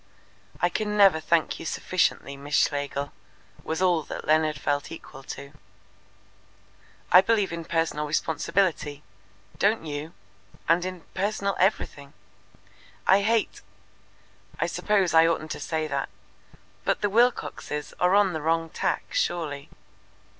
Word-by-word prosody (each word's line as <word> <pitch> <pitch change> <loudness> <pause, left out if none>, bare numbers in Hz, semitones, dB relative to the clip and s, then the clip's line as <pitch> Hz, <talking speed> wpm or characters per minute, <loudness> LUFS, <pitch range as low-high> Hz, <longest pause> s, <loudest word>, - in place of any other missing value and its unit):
"I 175 - +2
can 210 +3 -2
never 195 -6 +6
thank 165 0 +1
you - - -7
sufficiently, 170 -6 0
Miss 140 +2 -4
Schlegel," 145 -1 0 0.5
was 160 +4 -2
all 175 -3 +3
that - - -7
Leonard 155 -1 +2
felt 145 0 -1
equal 150 -4 -10
to. 140 0 -8 1.6
"I 180 - +9
believe 205 -3 +1
in 170 -1 -5
personal 165 -2 -1
responsibility. 155 0 0 0.6
Don't 205 -3 +2
you? 150 +2 -5 0.5
And 170 +2 +3
in 185 -2 -5
personal 200 0 -1
everything. 145 -7 0 0.9
I 195 +2 +5
hate 225 +2 0 1.0
I - - +2
suppose 195 -5 +1
I 165 0 +7
oughtn't 155 -1 -1
to - - -4
say 155 +1 -2
that 140 -2 -2 0.7
but - - 0
the 205 - +1
Wilcoxes 225 -10 0
are 180 +2 +4
on 200 -3 +4
the 160 - -3
wrong 165 +1 0
tack - - -2
surely. 160 - -2
165 Hz, 130 wpm, -26 LUFS, 150-195 Hz, 1.6 s, I